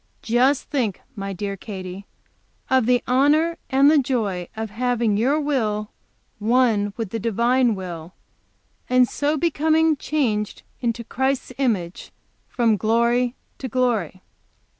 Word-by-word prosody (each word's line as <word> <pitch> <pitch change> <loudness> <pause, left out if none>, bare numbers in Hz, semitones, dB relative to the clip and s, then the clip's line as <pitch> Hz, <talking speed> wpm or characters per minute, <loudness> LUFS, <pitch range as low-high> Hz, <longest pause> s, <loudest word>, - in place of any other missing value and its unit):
Just 255 +4 +2
think, 240 -10 -2 0.2
my 195 -1 -4
dear 200 +1 -4
Katy, 190 -1 -8 0.6
of 260 -3 +3
the 245 -1 +3
honor 295 +6 +2
and 275 +2 +5
the 310 - +5
joy 215 -10 -1
of 220 -1 -5
having 235 -1 0
your 260 +8 +2
will 220 -8 -1 0.5
one 220 -2 +2
with 225 -5 -4
the 225 - -2
Divine 235 +2 +2
will, 175 -2 -7 0.8
and 250 0 +5
so 295 +4 -1
becoming 320 0 +2
changed 235 -9 -2 0.2
into 235 -1 -2
Christ's 265 +2 -2
image 195 -10 -1 0.4
from 230 -3 +1
glory 235 +4 +1 0.2
to 265 - -4
glory! 225 -8 -1
235 Hz, 125 wpm, -22 LUFS, 210-265 Hz, 0.8 s, and